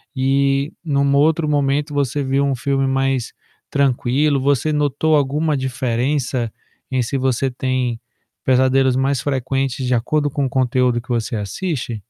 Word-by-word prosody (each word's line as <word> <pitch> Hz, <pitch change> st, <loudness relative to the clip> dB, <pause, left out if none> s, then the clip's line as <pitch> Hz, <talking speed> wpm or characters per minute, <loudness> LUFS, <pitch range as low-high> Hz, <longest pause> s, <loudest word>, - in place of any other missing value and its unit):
e, 135 Hz, +2 st, +1 dB
num 140 Hz, -3 st, +1 dB
outro 155 Hz, +2 st, +3 dB
momento, 145 Hz, 0 st, 0 dB
você 140 Hz, 0 st, 0 dB
viu 135 Hz, +1 st, +1 dB
um 135 Hz, -1 st, 0 dB
filme 135 Hz, +2 st, 0 dB
mais 135 Hz, -2 st, 0 dB, 0.4 s
tranquilo. 140 Hz, +1 st, +1 dB
Você 140 Hz, +3 st, +1 dB
notou 150 Hz, +2 st, +1 dB
alguma 150 Hz, +2 st, +1 dB
diferença 130 Hz, -1 st, -1 dB, 0.4 s
em 130 Hz, -1 st, 0 dB
se 135 Hz, +4 st, -2 dB
você 130 Hz, 0 st, 0 dB
tem 125 Hz, -2 st, -2 dB, 0.4 s
pesadelos 130 Hz, 0 st, +3 dB
mais 135 Hz, 0 st, +1 dB
frequentes 135 Hz, -1 st, -1 dB
de 125 Hz, -, +1 dB
acordo 145 Hz, +5 st, +1 dB
com 140 Hz, -1 st, -1 dB
o -, -, -1 dB
conteúdo 125 Hz, -2 st, +1 dB
que 130 Hz, -, -26 dB
você 115 Hz, -1 st, -1 dB
assiste? 115 Hz, -, -3 dB
135 Hz, 145 wpm, -19 LUFS, 125-140 Hz, 0.4 s, outro